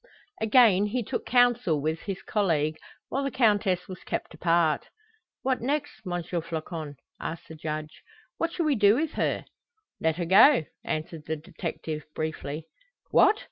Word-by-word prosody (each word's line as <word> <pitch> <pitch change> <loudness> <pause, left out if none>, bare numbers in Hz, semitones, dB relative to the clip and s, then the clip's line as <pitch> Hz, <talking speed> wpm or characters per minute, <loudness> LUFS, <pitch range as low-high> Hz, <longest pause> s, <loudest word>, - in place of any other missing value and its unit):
Again 215 -3 +5
he 245 +3 -1
took - - -4
counsel 245 -10 +3
with 155 +3 -1
his 195 0 -5
colleague, 160 -7 +1 0.3
while 275 - -1
the 275 - 0
Countess 205 -8 +2
was 185 -2 -8
kept - - -4
apart. 165 -2 +2 0.6
"What 260 -1 0
next, 290 +4 -1
M. 175 -1 -2
Floçon?" 165 -3 -4 0.2
asked 165 - -6
the - - -8
Judge. 155 0 -5 0.4
"What 335 0 0
shall 340 -1 -1
we 300 - +3
do 205 -3 +5
with 310 +3 0
her?" - - -1 0.5
"Let 160 -1 +1
her 175 - -1
go," 195 - +7 0.2
answered 155 0 -4
the 160 - -1
detective, 155 -1 -5
briefly. 155 -1 -4 0.5
"What! 420 - +6
180 Hz, 150 wpm, -27 LUFS, 160-240 Hz, 0.6 s, go